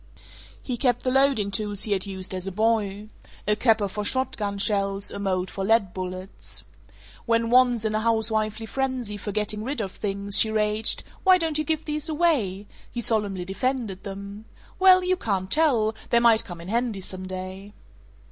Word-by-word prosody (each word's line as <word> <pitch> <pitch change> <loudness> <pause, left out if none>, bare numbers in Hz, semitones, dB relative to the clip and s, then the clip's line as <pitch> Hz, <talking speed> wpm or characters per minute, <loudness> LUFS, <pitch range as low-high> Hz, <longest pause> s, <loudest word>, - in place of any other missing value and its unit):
He 250 -3 -3
kept 245 -1 +1
the 255 - +1
loading 265 -7 +2
tools 205 0 -1
he 215 - +1
had 195 0 +1
used 190 -1 -3
as 185 0 -3
a - - -2
boy: 210 0 0 0.4
a 210 - +4
capper 220 -2 +3
for 210 +2 -4
shot 260 +5 +1
gun 200 -2 -3
shells, 200 -1 0
a - - -5
mold 185 -2 -1
for 195 - -4
lead 210 -2 +2
bullets. 180 - -5 0.6
When 230 0 +1
once, 245 -3 +4
in 215 - 0
a 215 - +1
housewifely 220 -1 0
frenzy 255 -3 -2
for 205 0 -5
getting 210 +1 -1
rid 270 +2 -3
of 195 -4 -3
things, 200 0 0
she 220 - +5
raged, 215 0 +1 0.2
"Why 375 -1 +7
don't 320 -3 -1
you - - +1
give 315 +1 -2
these 300 +1 -2
away?" 280 - +1 0.2
he 240 - -5
solemnly 205 -6 0
defended 215 -1 -2
them, 200 +2 -8 0.3
"Well, 370 -1 +7
you 365 0 +1
can't 190 - -2
tell; 250 -9 +3 0.2
they 235 - +4
might 230 -1 +4
come 175 -5 -8
in 170 - -10
handy 230 -3 -1
some 185 0 -7
day." 185 +2 -7
215 Hz, 185 wpm, -25 LUFS, 195-240 Hz, 0.6 s, Why